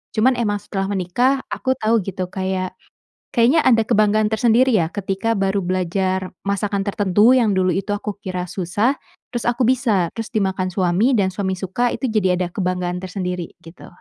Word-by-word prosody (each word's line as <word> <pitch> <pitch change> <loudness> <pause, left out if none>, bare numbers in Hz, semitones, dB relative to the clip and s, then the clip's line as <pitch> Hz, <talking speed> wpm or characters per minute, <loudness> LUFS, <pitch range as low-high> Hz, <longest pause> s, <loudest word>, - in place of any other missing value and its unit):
Cuman 245 +4 +4
emang 205 -3 0
setelah 195 -1 -3
menikah 205 +8 +1
aku 260 0 -1
tahu 225 -1 +2
gitu, 185 -2 -4
kayak, 190 -1 -2 0.6
kayaknya 250 +7 +4
ada 230 -3 +4
kebanggaan 215 0 +3
tersendiri 235 +3 +3
ya 165 -4 +1
ketika 195 +2 -2
baru 195 0 0
belajar 185 +1 -1
masakan 200 0 -1
tertentu 205 +2 +3
yang 235 -6 +3
dulu 185 -1 +2
itu 195 +3 -1
aku 205 0 -5
kira 185 -2 -4
susah, 200 +9 0 0.4
terus 240 -1 -3
aku 240 +1 +1
bisa, 225 -8 +2
terus 225 -1 -4
dimakan 190 -3 0
suami 190 +7 +2
dan 195 -4 +1
suami 190 0 -2
suka, 195 +6 -1
itu 265 - -2
jadi 190 -4 +2
ada 180 - 0
kebanggaan 180 -1 -2
tersendiri, 180 -2 -5
gitu. 165 +2 -13
200 Hz, 165 wpm, -20 LUFS, 185-225 Hz, 0.6 s, Cuman